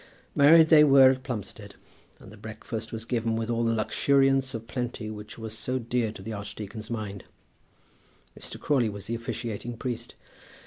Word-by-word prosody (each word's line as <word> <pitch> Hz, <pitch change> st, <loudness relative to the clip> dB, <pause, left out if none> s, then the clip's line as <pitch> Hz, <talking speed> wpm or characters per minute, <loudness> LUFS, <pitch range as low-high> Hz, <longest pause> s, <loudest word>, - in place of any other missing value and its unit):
Married 160 Hz, +3 st, +7 dB
they 155 Hz, -2 st, +8 dB
were 135 Hz, -2 st, +7 dB
at 130 Hz, 0 st, -3 dB
Plumstead, 120 Hz, -6 st, -7 dB, 0.4 s
and 95 Hz, -, -14 dB
the -, -, -12 dB
breakfast 110 Hz, +1 st, -7 dB
was 115 Hz, 0 st, -5 dB
given 115 Hz, -2 st, -1 dB
with 115 Hz, +1 st, -2 dB
all 115 Hz, 0 st, 0 dB
that 115 Hz, 0 st, +2 dB
luxuriance 135 Hz, +3 st, +2 dB
of 115 Hz, 0 st, -6 dB
plenty 120 Hz, -2 st, -4 dB
which 105 Hz, 0 st, -9 dB
was 110 Hz, -1 st, -5 dB
so 130 Hz, +3 st, -2 dB
dear 120 Hz, -2 st, -1 dB
to 95 Hz, -, -11 dB
the 110 Hz, -, -5 dB
archdeacon's 105 Hz, +1 st, -7 dB
mind. 105 Hz, -4 st, -5 dB, 1.1 s
Mr. -, -, -7 dB
Crawley 130 Hz, -6 st, +1 dB
was 100 Hz, -1 st, -8 dB
the 115 Hz, -, -4 dB
officiating 115 Hz, 0 st, -5 dB
priest. 120 Hz, -1 st, -5 dB
115 Hz, 170 wpm, -27 LUFS, 110-130 Hz, 1.1 s, they